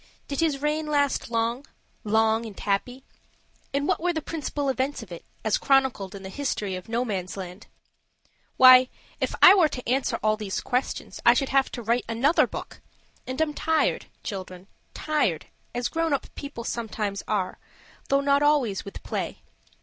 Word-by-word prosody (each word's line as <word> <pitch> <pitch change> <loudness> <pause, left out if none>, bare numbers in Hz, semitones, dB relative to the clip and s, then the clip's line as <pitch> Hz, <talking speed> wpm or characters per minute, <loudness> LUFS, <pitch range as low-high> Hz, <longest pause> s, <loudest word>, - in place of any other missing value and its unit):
Did 280 - -4
his 295 -4 0
reign 305 +1 0
last 285 -4 +1
long 235 +3 -1 0.4
long 220 +1 +2
and 205 - -10
happy? 245 +6 -2 0.7
and 280 +2 -1
what 375 - +1
were 355 +1 +1
the 320 - -1
principal 295 -2 -3
events 265 +2 -1
of 185 - -15
it, 170 - -8 0.2
as 220 - +2
chronicled 265 -8 +1
in 195 - -9
the 190 - -6
history 210 -6 -2
of 185 - -8
Nomansland? 195 -5 -4 0.9
Why, 255 0 +9 0.3
if - - -1
I 370 - +11
were 355 -6 +4
to 250 -3 -7
answer 260 +3 +1
all 215 0 +2
these 205 -3 -3
questions 250 +2 -3
I - - +7
should 275 - 0
have 270 -1 +2
to 240 - -5
write 235 +3 +1
another 250 +8 +3
book. - - -8 0.5
And 255 +2 -4
I'm 315 -1 +1
tired, 320 +1 0 0.2
children, 185 -3 -6 0.3
tired 295 - 0 0.3
as 245 0 0
grown 330 -2 -1
up 275 - -3
people 280 -5 -7
sometimes 215 -4 -3
are, 195 -4 -1 0.5
though 275 0 +3
not 280 0 +3
always 285 -9 +2
with 200 - -9
play. - - -4
250 Hz, 165 wpm, -26 LUFS, 210-285 Hz, 0.9 s, I